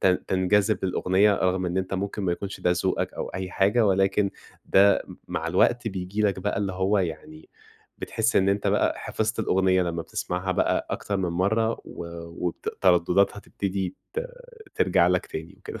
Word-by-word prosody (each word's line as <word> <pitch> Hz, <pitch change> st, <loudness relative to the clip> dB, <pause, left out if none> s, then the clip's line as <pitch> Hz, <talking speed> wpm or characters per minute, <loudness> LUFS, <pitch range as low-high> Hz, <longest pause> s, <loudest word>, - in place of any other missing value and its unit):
تن 90 Hz, -1 st, +2 dB
تنجذب 100 Hz, +2 st, +2 dB
للأغنية 95 Hz, +2 st, +3 dB
رغم 95 Hz, 0 st, 0 dB
إن 90 Hz, +2 st, -1 dB
أنت 95 Hz, +1 st, -2 dB
ممكن 100 Hz, +2 st, -3 dB
ما 90 Hz, -2 st, +1 dB
يكونش 100 Hz, +2 st, -6 dB
ده 90 Hz, -, +2 dB
ذوقك 95 Hz, -, -1 dB
أو -, -, -4 dB
أي 95 Hz, 0 st, -5 dB
حاجة. 105 Hz, +5 st, +3 dB
ولكن 95 Hz, +1 st, +2 dB, 0.4 s
ده 100 Hz, +1 st, +5 dB
م -, -, -9 dB
مع 80 Hz, -, -3 dB
الوقت 115 Hz, +7 st, +2 dB
بييجي 95 Hz, +1 st, -3 dB
لك 100 Hz, -2 st, +1 dB
بقى 100 Hz, +1 st, -1 dB
اللي 100 Hz, -2 st, -1 dB
هو 95 Hz, +2 st, +1 dB
يعني 80 Hz, -3 st, -5 dB, 0.5 s
بتحس 115 Hz, +1 st, 0 dB
إن 95 Hz, 0 st, +4 dB
أنت 100 Hz, +1 st, 0 dB
بقى -, -, +2 dB
حفظت 110 Hz, +1 st, -2 dB
الأغنية 95 Hz, -3 st, +2 dB
لمّا 85 Hz, -1 st, -2 dB
بتسمعها 90 Hz, +3 st, -3 dB
بقى -, -, +1 dB
أكتر 100 Hz, -, -2 dB
من 95 Hz, -2 st, -1 dB
مرّة 110 Hz, +6 st, +1 dB
و -, -, -8 dB, 0.4 s
وبت 85 Hz, -, -4 dB
تردداتها 90 Hz, +2 st, +3 dB
تبتدي 95 Hz, -2 st, -4 dB, 0.2 s
ت 470 Hz, -, -1 dB, 0.5 s
ترجع 440 Hz, -, +3 dB
لك -, -, +1 dB
تاني -, -, -7 dB
وكده. 435 Hz, -, -8 dB
95 Hz, 175 wpm, -25 LUFS, 90-105 Hz, 0.5 s, ده